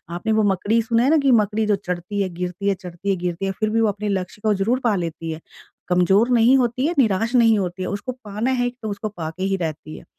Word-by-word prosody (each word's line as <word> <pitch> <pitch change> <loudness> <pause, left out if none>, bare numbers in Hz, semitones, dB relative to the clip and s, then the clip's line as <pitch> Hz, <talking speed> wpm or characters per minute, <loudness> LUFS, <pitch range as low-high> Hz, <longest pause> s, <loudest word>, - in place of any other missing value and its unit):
आपने 175 +5 -2
वो 215 0 +3
मकड़ी 205 +5 +1
सुना 230 0 +1
है 265 - +3
ना 320 - +5
कि 280 -3 +3
मकड़ी 215 -1 +2
जो 210 -1 +2
चढ़ती 185 +1 -4
है, 190 - -1
गिरती 180 +2 -4
है, 200 - +1
चढ़ती 180 +1 -7
है, 195 - +3
गिरती 175 +1 -3
है, 195 - 0
फिर 215 -1 +1
भी 225 +1 +1
वो 225 - +3
अपने 205 +1 -3
लक्ष्य 190 +1 -3
को 215 - +4
ज़रूर 220 +6 0
पा 230 -4 +2
लेती 165 -2 -4
है। 160 0 -7 0.5
कमज़ोर 190 +6 +3
नहीं 240 +2 +5
होती 250 +1 0
है, 340 - 0
निराश 225 0 +2
नहीं 225 -3 +5
होती 180 -1 -3
है, - - -3
उसको 205 +6 -4
पाना 210 +5 -2
है 245 -1 +1
तो 215 - -3
उसको 205 +1 -4
पा 170 -6 -5
के 185 +3 -6
ही 195 0 0
रहती 155 -3 -5
है। - - -12
200 Hz, 265 wpm, -22 LUFS, 180-225 Hz, 0.5 s, ना